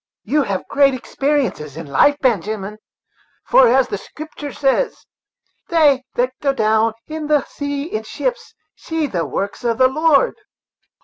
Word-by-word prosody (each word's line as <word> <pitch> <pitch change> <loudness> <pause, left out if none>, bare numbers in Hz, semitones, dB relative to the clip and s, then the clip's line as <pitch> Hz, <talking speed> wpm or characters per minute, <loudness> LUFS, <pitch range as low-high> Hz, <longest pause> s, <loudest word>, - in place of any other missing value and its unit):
"You 300 +1 +1
have 195 -8 -2
had - - -26
great 280 -1 +3
experiences 255 - -2
in 165 - -6
life, 150 - +3
Benjamin; 215 -3 -1 0.7
for, 260 - +6
as 255 +2 +3
the 205 - -4
Scripter 305 +3 -9
says, 275 - 0 0.6
'They 295 -6 +4
that 250 +1 0
go 275 -1 +1
down 220 -2 +2
to 310 -1 -5
the 295 -2 +3
sea 285 -1 -4
in 395 +8 -4
ships - - -4 0.2
see 325 -1 -3
the 175 - -2
works 200 - -4
of 230 -2 0
the 255 - +5
Lord.'" 310 - +2
270 Hz, 150 wpm, -19 LUFS, 220-300 Hz, 0.7 s, for